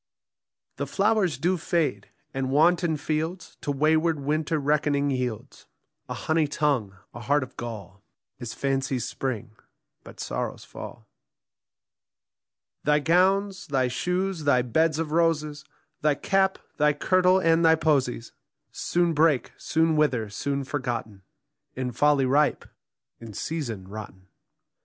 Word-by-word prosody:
The - - -3
flowers 200 - +1
do 180 +6 +1
fade; 155 - -1 0.2
and 135 -1 -2
wanton 165 +3 +3
fields 160 +4 -3
To 145 - -2
wayward 155 +2 +2
winter 155 +3 0
reckoning 145 -1 +1
yields: 125 -4 -4 0.4
A - - -3
honey 160 -1 +1
tongue, 140 -9 0 0.2
a - - -8
heart 140 +5 +1
of 130 - -11
gall, 105 -5 -7 0.4
Is 120 -2 -6
fancy's 135 -2 -1
spring, 120 -4 -4 0.5
but - - -13
sorrow's - - -4
fall. - - -10 1.8
Thy 150 0 +4
gowns, 190 +5 +2
thy 130 -3 +1
shoes, 180 +4 -2
thy 125 -4 +4
beds 155 +6 +1
of 160 -2 -2
roses, 155 -2 +1 0.4
Thy 150 -1 +3
cap, 190 +4 +1 0.2
thy 150 0 +4
kirtle, 185 +4 +3
and 165 -1 +3
thy 160 0 +6
posies 140 -7 0 0.4
Soon 175 -1 0
break, 155 -3 +2
soon 160 0 +1
wither, 125 -9 +1
soon 140 +6 -2
forgotten, 120 -7 -4 0.5
In 130 -1 -3
folly 145 +2 +3
ripe, 145 +3 +2 0.5
in 115 -3 -10 0.2
reason 115 - -4
rotten. 95 -2 -10
150 Hz, 125 wpm, -26 LUFS, 130-165 Hz, 1.8 s, thy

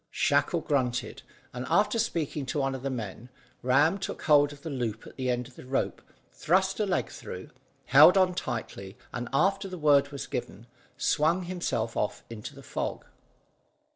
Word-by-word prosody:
Shackle - - +1
grunted; 125 -4 -1 0.3
and, 125 +1 -5
after 210 +3 +3
speaking 150 -8 -1
to 155 - -2
one 135 0 0
of 130 - -5
the 135 - -2
men, 115 -1 -6 0.3
Ram 145 +9 +3
took 190 - -5
hold 145 -2 +5
of 145 -1 -13
the 165 - -4
loop 115 -5 -3
at - - -12
the 130 -1 -2
end 125 -1 -1
of 130 - -18
the - - -11
rope, 135 - -1 0.3
thrust 190 +4 +1
a 210 - +1
leg 185 - 0
through, - - -8 0.3
held 180 - +8
on 185 -1 +4
tightly, 110 - -5 0.2
and, 120 -1 -4
after 195 +8 +2
the 185 -1 -7
word 145 -3 +4
was 140 -1 -6
given, 115 -2 -5 0.3
swung 160 +7 +2
himself 170 -11 -2
off 105 - -2
into 110 -2 -8
the - - -12
fog. - - -4
140 Hz, 175 wpm, -28 LUFS, 125-175 Hz, 0.3 s, held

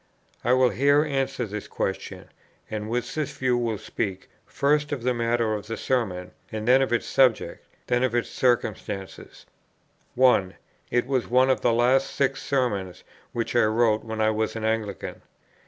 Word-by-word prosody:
I 120 - +3
will 130 -1 +4
here 140 +3 +4
answer 135 -4 -1
this 105 -1 -6
question; - - -4 0.4
and 110 0 -4
with 120 +1 -2
this 155 -3 -3
view 130 -1 +1
will 115 -3 -1
speak, 95 -2 -4 0.2
first 145 +1 +1
of 135 -5 -3
the 125 0 +2
matter 115 -1 0
of 105 0 -5
the 115 - -4
Sermon, 95 -8 -1 0.2
then 120 +5 +3
of 135 - 0
its 120 - +1
subject, 130 -4 +2 0.2
then 120 0 +1
of 130 -2 +1
its 120 - +1
circumstances. 110 -6 -2 0.7
1. 120 -7 +3 0.3
It 120 0 +1
was 130 -2 -1
one 130 +2 +4
of 130 - 0
the 120 - +3
last 125 +4 +3
six 135 -1 0
Sermons 105 -10 -1 0.3
which 115 0 -3
I 120 - +5
wrote 110 0 +2
when 110 -1 -4
I 110 0 +3
was 110 +1 -1
an 110 - -4
Anglican. 110 -4 -3
120 Hz, 170 wpm, -25 LUFS, 110-130 Hz, 0.7 s, I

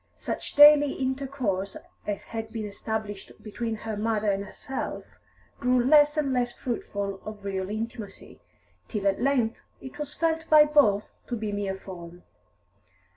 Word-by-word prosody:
Such - - -4
daily 290 -1 +8
intercourse 260 -8 -2 0.3
as 205 -1 -2
had 225 -1 -6
been 220 -2 -4
established 210 -1 -5
between 225 +1 -3
her 220 0 -5
mother 215 -1 +1
and 200 0 -2
herself 265 +6 -5 0.5
grew 250 0 +3
less 295 +2 +6
and 280 -3 +1
less 245 -1 +1
fruitful 200 -6 -4
of 215 -2 -8
real 190 -1 -2
intimacy, 220 0 -6 0.5
till 210 -3 -3
at 195 +2 +2
length 245 -4 +1 0.2
it 265 +3 -10
was 295 -1 -5
felt 325 -1 0
by 305 -1 +8
both 275 -9 +3
to 245 - -2
be 215 -2 -3
mere 200 -1 -2
form. 175 -2 -10
225 Hz, 145 wpm, -27 LUFS, 200-270 Hz, 0.5 s, daily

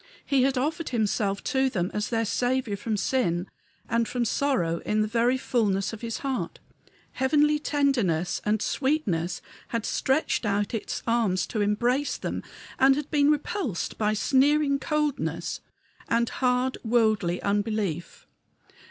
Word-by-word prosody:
He 275 -2 +2
had 265 0 +2
offered 315 +5 -1
himself 210 -4 0
to 265 0 +1
them 185 -6 -2
as 210 0 -2
their 230 -1 0
Saviour 245 0 0
from 210 +1 -2
sin 195 -6 0 0.4
and 230 0 +1
from 245 -1 -1
sorrow 210 -11 0
in 215 0 0
the - - -1
very 240 +3 +2
fullness 210 -6 0
of 220 - -8
his 230 -1 -3
heart. 265 -2 -2 0.5
Heavenly 295 +3 +2
tenderness 245 - +1
and 215 0 +1
sweetness 205 - -1 0.2
had 230 -2 -3
stretched 270 +1 0
out 205 0 0
its 225 - -3
arms 215 -7 +1
to 220 - -3
embrace 240 +7 +1
them, - - -4 0.4
and 270 +2 +4
been 290 -1 +4
repulsed 300 - -1
by 215 -1 +2
sneering 280 +5 +3
coldness 300 0 -2 0.5
and 235 0 +2
hard, 255 0 0
worldly 220 -6 +2
unbelief. 200 -5 -2
235 Hz, 135 wpm, -26 LUFS, 205-270 Hz, 0.5 s, and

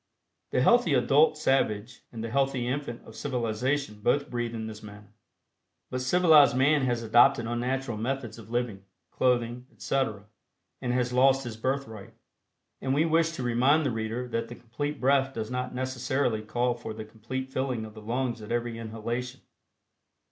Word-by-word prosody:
The - - +1
healthy 235 - +4
adult 140 +5 +4
savage 115 -5 0
and 115 -2 -6
the 115 - -4
healthy 135 -2 +1
infant 130 -2 -3
of 110 - -13
civilization 125 -2 -2
both 140 +6 +1
breathe 120 -1 -2
in 110 -1 -4
this 110 -1 -8
manner, 105 0 -13 0.8
but 130 0 -2
civilized 155 -2 +5
man 145 +3 +4
has 120 -2 -1
adopted 120 +2 +5
unnatural 120 +1 -2
methods 120 0 -3
of 110 - -13
living, 120 -5 -2 0.3
clothing, 125 0 0
etc., 110 -7 -2 0.6
and 125 - -1
has 125 0 0
lost 135 +1 +4
his 120 -3 -6
birthright. 110 -4 -4 0.7
And 135 0 0
we 155 +3 +3
wish 165 0 +2
to 130 - -5
remind 130 +6 +3
the 135 - +1
reader 115 +2 -3
that 115 -1 -2
the 120 - -9
Complete 145 +6 -5
Breath 135 0 +2
does 110 +1 -4
not 125 0 -3
necessarily 130 -2 -1
call 120 +3 0
for 120 -2 -7
the 110 0 -7
complete 120 +5 -6
filling 130 -4 -2
of 110 - -11
the 110 - -11
lungs 120 +1 -2
at 105 - -8
every 120 -1 -2
inhalation. 115 +3 -5
125 Hz, 165 wpm, -28 LUFS, 115-135 Hz, 0.8 s, civilized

